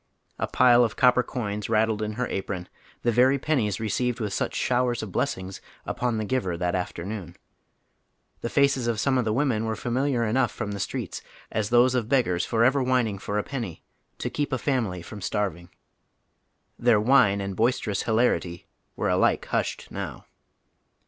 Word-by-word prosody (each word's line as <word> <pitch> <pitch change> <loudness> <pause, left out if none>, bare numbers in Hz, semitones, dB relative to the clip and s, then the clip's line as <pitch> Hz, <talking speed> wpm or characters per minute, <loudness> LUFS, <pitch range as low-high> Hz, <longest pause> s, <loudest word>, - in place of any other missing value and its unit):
A - - 0
pile 125 -1 +5
of 115 - -1
copper 125 0 +5
coins 105 -5 -4
rattled 110 -1 +2
in 105 0 -2
her 125 +3 -1
apron, 95 -2 -4 0.4
the 120 - +3
very 130 +4 +4
pennies 125 -9 0
received 120 +3 -1
with 105 -4 -2
sucli - - -2
showers 125 -2 +1
of 105 - -6
blessings 95 +1 -2 0.2
upon 120 -2 -1
the 110 - -2
giver 100 -8 -1
that 90 0 -1
afternoon; 90 0 -4 1.0
the 120 - -3
faces 140 -3 +2
of 115 -2 0
some 130 +2 +2
of 120 - 0
the 110 - +1
women 120 -2 +1
were 110 0 -1
familiar 125 +2 0
enough 120 +2 +1
from 110 -3 -4
the 100 - -5
streets - - -4 0.3
as 105 -1 -1
tliose 120 +1 +5
of 120 -3 -1
beggars 115 -10 +2
forever 125 +4 +3
whining 125 -6 +1
for 100 +1 -3
a 105 - 0
penny, 115 - -5 0.2
" - - -47
to - - -4
keep 145 -1 -2
a 130 - +1
family 115 - -1
from 105 +3 -9
starving," 95 -4 -2 1.1
Their 120 -3 +4
whine 110 -3 +4
and 100 -1 -4
boisterous 115 -2 0
hilarity 110 -7 0 0.3
wei'o - - +1
alike - - +2
hushed - - -2
now. - - -6
115 Hz, 175 wpm, -26 LUFS, 100-125 Hz, 1.1 s, pile